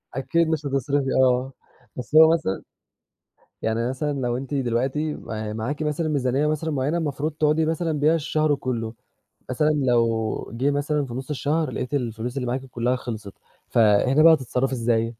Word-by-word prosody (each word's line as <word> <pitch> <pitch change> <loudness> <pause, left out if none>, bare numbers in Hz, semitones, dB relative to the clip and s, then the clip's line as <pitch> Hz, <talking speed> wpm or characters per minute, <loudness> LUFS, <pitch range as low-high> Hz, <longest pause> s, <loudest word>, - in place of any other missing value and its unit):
أكيد 160 +5 +1
مش 155 -2 -1
هتصرفي 135 0 0
آه. 130 +1 +1 0.4
بس 125 +4 -6
هو 160 +1 +8
مثلًا، 95 - -2 1.0
يعني 115 +2 0
مثلًا 145 +3 -2
لو 120 -1 -1
أنتِ 135 +2 -5
دلوقتي 135 +4 -1
م 110 -1 -5
معاكِ 145 +8 -3
مثًلا 155 +2 -1
ميزانية 140 0 +1
مثلًا 155 +1 -1
معيّنة 145 +4 0
المفروض 150 0 -2
تقعدي 155 +1 +1
مثلًا 165 0 -1
بيها 155 +3 +4
الشهر 155 -1 +1
كلّه، 115 -4 -3 0.6
مثلًا 150 +4 +1
لو 115 -8 0
جِه 135 +5 +1
مثلًا 145 0 0
في 120 - -8
نص 130 +3 -6
الشهر 150 +2 -1
لاقيتِ 130 - -4
الفلوس 120 -1 -3
اللي 125 -2 -2
معاكِ 130 +2 -2
كلّها 125 0 -1
خِلصت، 110 -5 -6 0.4
فهنا 115 +7 +4
بقى 165 -1 +9
هتتصرفي 130 -1 0
إزاي؟ 115 -1 +1
135 Hz, 160 wpm, -24 LUFS, 120-150 Hz, 1.0 s, بقى